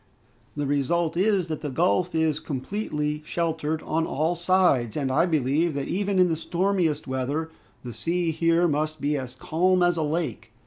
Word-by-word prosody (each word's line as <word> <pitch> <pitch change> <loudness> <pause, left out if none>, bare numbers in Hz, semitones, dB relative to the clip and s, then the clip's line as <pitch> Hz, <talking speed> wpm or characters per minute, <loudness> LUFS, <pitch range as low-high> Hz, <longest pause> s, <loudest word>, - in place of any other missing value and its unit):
The 145 -1 -2
result 145 +4 0
is 190 -1 +2
that 155 -2 -4
the 150 - -3
gulf 175 +4 +1
is 160 -2 +1
completely 150 0 -3
sheltered 160 -1 -2
on 160 +1 -1
all 160 +4 0
sides, 170 - +2
and 135 -3 -1
I 155 +7 +3
believe 155 +1 +1
that 140 - -2
even 200 0 0
in 180 -1 +5
the 165 - 0
stormiest 170 -2 0
weather, 140 +5 -2 0.3
the 120 -2 -7
sea 170 +3 -1
here 165 +2 +2
must 155 0 -1
be 145 +1 0
as 130 -3 -5
calm 180 +6 +1
as 175 -1 +2
a - - 0
lake." 150 - -3
160 Hz, 175 wpm, -25 LUFS, 145-175 Hz, 0.3 s, in